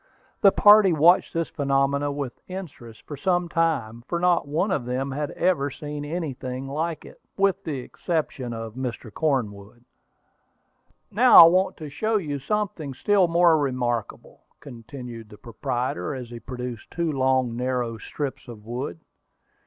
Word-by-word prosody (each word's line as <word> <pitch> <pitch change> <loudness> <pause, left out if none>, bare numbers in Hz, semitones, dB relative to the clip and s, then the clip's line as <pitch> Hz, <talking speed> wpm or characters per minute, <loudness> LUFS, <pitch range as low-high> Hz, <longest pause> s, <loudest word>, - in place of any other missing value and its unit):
The 195 - +7
party 205 -3 +6
watched 165 +4 +4
this 165 -1 -1
phenomenon 140 0 0
with 140 -4 -5
interest 160 -12 -9
for 145 - -7
some 175 +4 0
time, 135 -10 -1
for 170 - -2
not 175 -4 +2
one 165 +8 0
of 140 - 0
them 130 +2 -2
had 145 +1 -3
ever 170 -6 +1
seen 145 +1 -7
anything 135 -5 -5
like 155 +3 -3
it, - - -15 0.2
with 195 0 +1
the 150 -4 -3
exception 145 -4 -3
of 115 -1 -6
Mr. 125 -3 -6
Cornwood. 120 -6 -2 1.3
"Now, 245 +4 +5
I 170 - +13
want 185 +3 +2
to 155 -3 -7
show 220 +9 0
you 145 -7 -3
something 165 -4 -3
still 200 +4 +3
more 170 -1 +4
remarkable," 125 -5 -3 0.2
continued 120 -3 -10
the 105 - -13
proprietor, 115 -1 -3
as 125 -3 -7
he 120 - -7
produced 125 -1 -7
two 170 -1 -2
long, 130 -3 +1
narrow 125 -2 -2
strips 135 0 -5
of 115 -3 -10
board. 120 -6 -5
140 Hz, 150 wpm, -24 LUFS, 125-170 Hz, 1.3 s, I